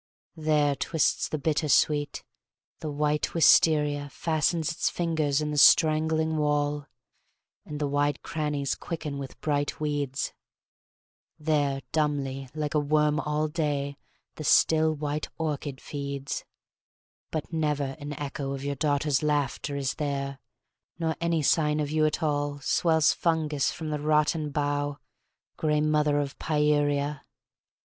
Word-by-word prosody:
There 150 -2 +2
twists 160 +4 0
the 155 - -2
bitter 150 +1 0
sweet, 145 0 +2 0.6
the 155 - -4
white 150 +2 -1
wisteria 150 -3 +4
Fastens 160 +1 0
its 165 - 0
fingers 155 -4 0
in 150 0 -2
the 150 - +1
strangling 160 +1 +4
wall, 145 -1 0 0.8
And 150 -1 -5
the 150 - 0
wide 145 0 0
crannies 150 -3 -2
quicken 155 -4 -5
with 135 -1 -8
bright 145 -1 -1
weeds; 145 -3 -2 1.0
There 145 -3 0
dumbly 140 -4 -1
like 150 -1 -2
a 150 - +3
worm 150 +1 +2
all 150 0 0
day 145 -3 -2 0.4
the 155 - -5
still 160 +1 +4
white 150 0 -3
orchid 145 -4 -3
feeds; 140 -1 -5 0.8
But 155 +1 -4
never 150 -4 -1
an 145 0 -5
echo 140 -1 -4
of 135 0 -6
your 140 0 -1
daughters' 145 0 +1
laughter 145 -1 -1
Is 135 -2 -1
there, 140 -2 -3 0.6
nor 160 -1 -1
any 170 -2 +1
sign 150 0 +2
of 150 -1 -2
you 155 0 +3
at 155 +2 -2
all 145 -1 -1
Swells 160 +2 +3
fungous 155 -4 0
from 160 -2 -5
the 150 - -2
rotten 150 +1 +1
bough, 145 0 -1 0.6
grey 150 -1 +1
mother 150 -1 +2
of 140 -1 -4
Pieria! 145 -1 +1
150 Hz, 135 wpm, -27 LUFS, 145-155 Hz, 1.0 s, wisteria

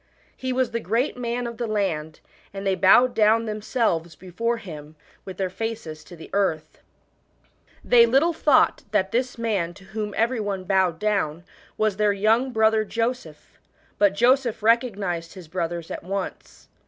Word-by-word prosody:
He 260 0 -4
was 255 -1 0
the 230 - -1
great 230 - -1
man 245 0 -3
of 235 -1 -6
the 240 - -3
land, 170 -8 -2 0.3
and 195 0 -5
they 195 - +2
bowed 195 +7 +5
down 220 +1 +3
themselves 210 -6 -1
before 230 +6 -3
him 155 -7 -10 0.3
with 190 -2 -8
their 190 - 0
face? 225 +2 -4 0.2
to 180 - -12
the 160 - -12
earth. 160 -6 -1 1.0
They 235 -1 +6
little 280 +8 +3
thought 295 -4 +3
that 195 -2 0
this 245 +1 -1
man 200 -7 -1
to 195 - -15
whom 210 +1 -5
every 235 +2 +1
one 200 -3 -3
bowed 185 -3 +1
down 175 -5 -1 0.3
was 215 -3 0
their 210 -1 +2
young 220 +6 +2
brother 220 -1 +3
Joseph, 230 -8 -4 0.4
but 200 -1 +4
Joseph 240 -1 +2
recognised 205 -8 0
his 180 -4 -11
brothers 170 0 -4
at - - -5
once. 195 +2 -6
210 Hz, 160 wpm, -24 LUFS, 185-235 Hz, 1.0 s, They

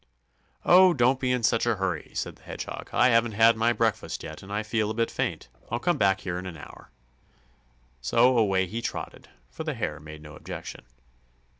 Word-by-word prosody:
"Oh, 180 0 +7
don't 130 +1 +3
be 130 -1 0
in 125 -2 0
such 115 +2 +2
a 120 - +2
hurry," 95 -5 -3
said - - -3
the - - -26
Hedgehog. - - -7
"I - - +4
haven't 115 -1 +3
had 115 +2 +5
my 115 +1 +2
breakfast 115 -3 -1
yet, 80 0 -8
and 95 - -11
I 105 +1 -1
feel 110 0 -1
a 110 - -3
bit 115 0 0
faint. - - -3 0.2
I'll 120 - -1
come 175 +8 0
back 95 -1 +3
here 90 -1 -3
in 95 - -7
an 85 -3 -8
hour." - - -13 1.1
So 120 - +4
away 95 -5 +3
he 110 +6 -5
trotted, - - -6 0.2
for - - -6
the 155 -3 -3
Hare 80 -10 -3
made 75 0 -11
no 75 0 -11
objection. - - -8
110 Hz, 200 wpm, -26 LUFS, 95-120 Hz, 1.1 s, Oh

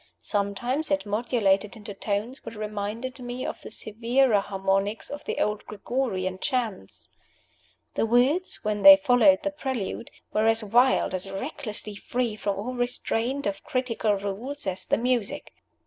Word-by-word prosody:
Sometimes 225 +9 -1
it 290 -4 +1
modulated 210 -1 +1
into 210 -2 -8
tones 210 +6 -3
which 230 - -8
reminded 215 +4 -4
me 245 +1 -5
of - - -5
the - - -9
severer 230 +2 +2
harmonies 195 +1 -1
of 290 - -6
the - - -3
old 210 0 0
Gregorian 200 -4 -2
chants. 235 - -2 0.8
The - - +1
words, 260 +10 +2
when 210 -1 -1
they 290 +4 +11
followed 245 -9 +5
the 295 - 0
prelude, 260 -7 -4 0.2
were 215 +1 +3
as 225 0 +2
wild, 240 +1 +3
as 185 +1 -3
recklessly 215 0 -4
free 235 +2 -2
from 200 -1 -2
all 230 +6 -4
restraint 245 +2 -1
of 200 -1 -2
critical 230 -5 0
rules, 205 +9 -3
as 190 -1 -1
the - - +2
music. 240 -2 -1
225 Hz, 145 wpm, -26 LUFS, 200-255 Hz, 0.8 s, they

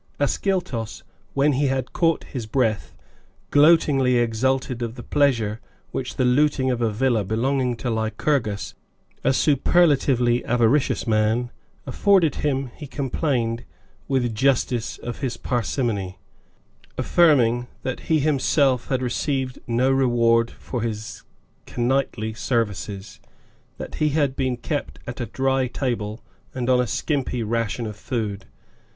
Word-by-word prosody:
Ascyltos, 145 - -1 0.3
when 140 +2 +3
he 140 +2 +1
had 130 -1 -2
caught 165 -2 +1
his 120 -5 -6
breath, 110 -3 0 0.6
gloatingly 145 -4 +5
exulted 120 +2 0
of 115 0 -3
the 120 - -9
pleasure 115 -7 +1 0.3
which - - -4
the 130 - +1
looting 130 0 +2
of 120 -1 -2
a 115 - +2
villa 115 0 +1
belonging 125 +4 0
to 115 - -6
Lycurgus, 110 0 -1 0.5
a - - +3
superlatively 135 -3 +3
avaricious 120 +4 +2
man, 110 +2 +1 0.3
afforded 190 -8 +3
him: 135 -3 -1
he 150 - -9
complained, 130 -4 -1 0.4
with 125 -4 0
justice 125 -1 +1
of 120 - -6
his 130 -4 -3
parsimony, 115 -6 -2 0.8
affirming 125 -8 +3 0.2
that 130 - -3
he 160 -1 +4
himself 135 -3 +2
had 130 -2 -1
received 130 +1 -2
no 125 +3 +2
reward 120 -3 +3
for 125 - -6
his 110 -2 -4 0.5
k - - -8
nightly 120 -3 0
services, 105 -4 -3 0.6
that - - -7
he 155 - +4
had 145 -3 +1
been 130 -2 -1
kept 145 +4 -4
at 120 +1 -6
a 120 - -3
dry 135 -1 0
table 120 -4 -3 0.3
and 130 0 0
on 125 - +4
a 125 - -1
skimpy 130 -1 -1
ration 115 +1 -1
of 105 -1 -5
food. 105 - -4
125 Hz, 130 wpm, -23 LUFS, 115-135 Hz, 0.8 s, gloatingly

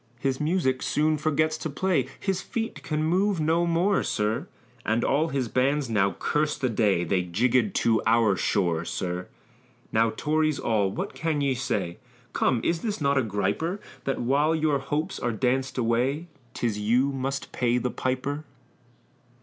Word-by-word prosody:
His 130 +1 -1
music 150 -5 +1
soon 155 +1 +1
forgets 155 +1 +1
to 160 - -3
play 150 -3 0
His 190 -2 -1
feet 225 +3 -4
can 155 0 -2
move 185 +3 +2
no 165 +3 +2
more, 175 +4 +2
sir, 105 +1 -1 0.4
And 115 +2 +1
all 150 +4 +2
his 135 -5 -1
bands 135 +2 +1
now 100 -2 +2
curse 150 0 0
the 130 - 0
day 105 -6 +2
They 90 +2 +1
jiggèd 115 +5 +1
to 115 -1 +3
our 110 -3 +4
shore, 85 -4 +1
sir. 90 +1 -3 0.6
Now 115 +1 +3
Tories 155 -1 +1
all, 105 -4 +1
what - - -4
can 160 -2 -1
ye 140 -2 +1
say? 105 -9 -2 0.3
Come 120 - +2
is 170 - +1 0.2
not 140 -2 +2
this 130 - +3
a - - -4
griper, 105 - -1 0.3
That 135 - -1
while 145 +6 +2
your 155 -3 +1
hopes 150 +6 -2
are 120 - -1
danced 130 +3 0
away, 125 +6 +1 0.3
'Tis 110 -3 -1
you 120 +6 +2
must 135 +1 -3
pay 120 -1 +1
the 125 0 -1
piper? 130 +4 -2
130 Hz, 165 wpm, -26 LUFS, 115-155 Hz, 0.6 s, our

